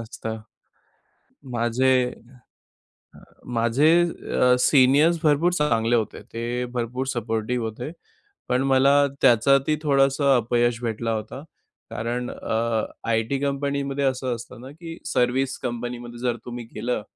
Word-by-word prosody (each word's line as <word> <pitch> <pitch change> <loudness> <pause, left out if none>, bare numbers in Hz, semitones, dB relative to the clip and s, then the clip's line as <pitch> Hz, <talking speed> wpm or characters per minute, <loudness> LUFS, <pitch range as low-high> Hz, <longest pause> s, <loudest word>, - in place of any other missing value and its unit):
असतं. 110 -1 -6 1.1
माझे 125 +2 +2 1.4
माझे 115 +6 +2 0.2
अ, 125 -6 +1
सीनियर्स 145 +6 +4
भरपूर 155 +3 +3
चांगले 120 -7 +1
होते. 110 -2 -2
ते 120 +2 -2
भरपूर 125 +2 -2
सपोर्टिव्ह 115 +1 -2
होते. 120 +7 -5 0.6
पण 125 +1 +2
मला 135 +1 +5 0.3
त्याच्यातही 135 +5 +4
थोडंसं 140 -1 +3
अपयश 120 0 +1
भेटला 115 0 -2
होता. 110 +5 -5 0.5
कारण 120 +2 -3
अ, 115 -1 -1 0.2
आयटी 115 +4 0
कंपनीमध्ये 140 0 -2
असं 130 -2 -1
असतं 120 +1 -11
ना 130 +2 -10
की 165 +2 -9
सर्व्हिस 125 +2 0
कंपनीमध्ये 120 0 -6
जर 120 -1 -1
तुम्ही 120 -1 -6
गेलं 120 +1 -2
125 Hz, 110 wpm, -24 LUFS, 115-135 Hz, 1.4 s, मला